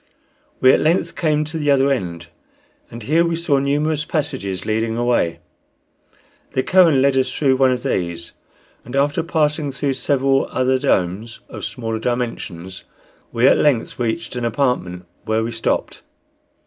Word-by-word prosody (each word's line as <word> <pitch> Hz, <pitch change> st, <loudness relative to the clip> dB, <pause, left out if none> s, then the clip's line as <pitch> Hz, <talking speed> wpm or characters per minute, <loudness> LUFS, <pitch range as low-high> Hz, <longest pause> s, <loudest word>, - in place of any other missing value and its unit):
We 130 Hz, -, +7 dB
at -, -, +3 dB
length 165 Hz, +1 st, +1 dB
came 155 Hz, -2 st, +1 dB
to 160 Hz, +2 st, -5 dB
the 145 Hz, -1 st, 0 dB
other 140 Hz, 0 st, +4 dB
end, 85 Hz, -9 st, -3 dB, 0.6 s
and 115 Hz, 0 st, -9 dB
here 160 Hz, +9 st, +3 dB
we 170 Hz, -1 st, 0 dB
saw 165 Hz, -4 st, +1 dB
numerous 150 Hz, +2 st, 0 dB
passages 130 Hz, -, -3 dB
leading 110 Hz, +1 st, -1 dB
away. 120 Hz, -9 st, +1 dB, 1.2 s
The 130 Hz, -, 0 dB
Kohen 165 Hz, -7 st, +4 dB
led 140 Hz, -1 st, +3 dB
us 130 Hz, -1 st, +1 dB
through 135 Hz, -3 st, +2 dB
one 135 Hz, 0 st, +4 dB
of 125 Hz, -1 st, -1 dB
these, 85 Hz, -1 st, -2 dB, 0.5 s
and 125 Hz, -, -8 dB
after 145 Hz, +1 st, +1 dB
passing 150 Hz, -2 st, 0 dB
through 135 Hz, +1 st, -1 dB
several 135 Hz, 0 st, +1 dB
other 130 Hz, 0 st, +1 dB
domes 100 Hz, +3 st, -1 dB
of -, -, -6 dB
smaller 115 Hz, -2 st, -4 dB
dimensions 110 Hz, -7 st, -4 dB, 0.5 s
we 120 Hz, +2 st, +3 dB
at -, -, +5 dB
length 130 Hz, -6 st, +1 dB
reached 120 Hz, +6 st, -2 dB
an 125 Hz, -, -3 dB
apartment 115 Hz, -8 st, -1 dB, 0.2 s
where 110 Hz, +1 st, 0 dB
we 115 Hz, -, -3 dB
stopped. 115 Hz, -1 st, -2 dB
130 Hz, 155 wpm, -20 LUFS, 115-145 Hz, 1.2 s, We